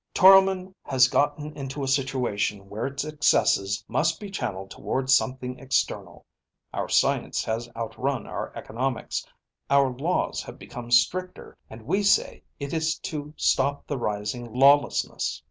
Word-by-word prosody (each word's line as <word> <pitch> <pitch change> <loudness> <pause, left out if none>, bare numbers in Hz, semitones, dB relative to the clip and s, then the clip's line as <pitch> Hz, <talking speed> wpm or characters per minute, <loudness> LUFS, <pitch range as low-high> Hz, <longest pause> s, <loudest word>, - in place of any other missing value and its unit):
Toromon 190 0 +6
has 130 -3 +4
gotten 145 +3 0
into 140 0 -5
a - - -2
situation 125 -7 -1
where 105 +5 -3
its 140 +1 -4
excesses 125 -9 +2
must 165 +2 0
be 205 -2 -8
channelled 95 - -4
toward 130 0 -2
something 130 -1 +1
external. 135 0 -2 0.5
Our - - -3
science - - +1
has 115 +1 -3
outrun 120 +2 -3
our - - -5
economics. 125 +2 -3 0.5
Our 140 -2 +3
laws 165 +8 -1
have - - -10
become 120 -1 -9
stricter, 175 +11 +1
and 110 0 -11
we 195 - 0
say 200 0 +2 0.2
it 140 -1 -5
is 160 0 0
to 150 0 -6
stop 140 +1 +1
the 145 - -3
rising 110 +2 -3
lawlessness. 140 +4 +3
135 Hz, 140 wpm, -25 LUFS, 120-150 Hz, 0.5 s, Toromon